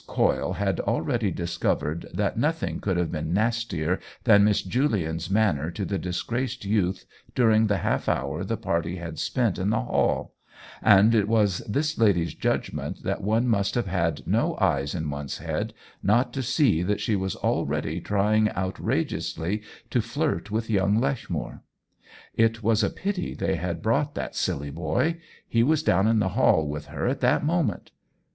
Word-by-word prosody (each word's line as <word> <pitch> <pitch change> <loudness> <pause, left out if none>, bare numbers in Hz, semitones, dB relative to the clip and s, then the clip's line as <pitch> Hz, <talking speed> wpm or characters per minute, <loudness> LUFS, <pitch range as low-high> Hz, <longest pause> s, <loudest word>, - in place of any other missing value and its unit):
Coyle - - +1
had - - -1
already 105 +6 0
discovered 85 -2 -2
that 100 +2 -1
nothing 155 +7 -1
could 95 -3 -1
have 85 -2 0
been 80 +3 -2
nastier 105 -6 0 0.2
than 105 -4 +6
Miss 105 -1 +3
Julian's 90 - -1
manner 95 -8 +2
to 95 +3 -4
the 100 -1 -2
disgraced 120 +7 -3
youth 100 -3 0 0.3
during 110 -3 +4
the 100 -1 +1
half - - -1
hour - - -1
the - - -2
party 85 +1 -1
had 85 -3 -6
spent 120 -7 0
in 95 +2 0
the 110 - +1
hall; - - 0 0.5
and 105 +1 +6
it 105 -3 +3
was 105 -4 +2
this 150 +7 -1
lady's 95 -7 +3
judgment - - -2
that - - -2
one 110 +5 +1
must 100 -4 +1
have 120 - +1
had 85 -4 -1
no - - +1
eyes 70 +2 +1
in 80 -3 -2
one's 70 -1 -5
head - - -3 0.3
not 120 +5 +2
to 135 - -2
see 125 - +2
that 100 +3 0
she 110 - 0
was 95 -1 -2
already - - -1
trying 105 +2 +2
out 95 +1 -3
rageously 95 +6 -1 0.3
to 120 - +2
flirt 120 +1 -2
with 110 +1 -2
young 100 0 +2
Lechmere. 135 0 -3 0.7
It 115 0 +1
was 110 0 +3
a 100 - +2
pity 195 -1 -3
they 95 - -1
had 85 -1 -3
brought 145 +6 +1
that - - -4
silly 70 +1 -2
boy; 85 - -1 0.3
he 115 - +2
was 155 +5 +2
down 95 - +3
in 115 0 +3
the 100 -3 +2
hall 90 - +3
with 75 0 -5
her - - -4
at - - 0
that - - +2
moment. 160 -8 0
105 Hz, 170 wpm, -26 LUFS, 85-115 Hz, 0.7 s, than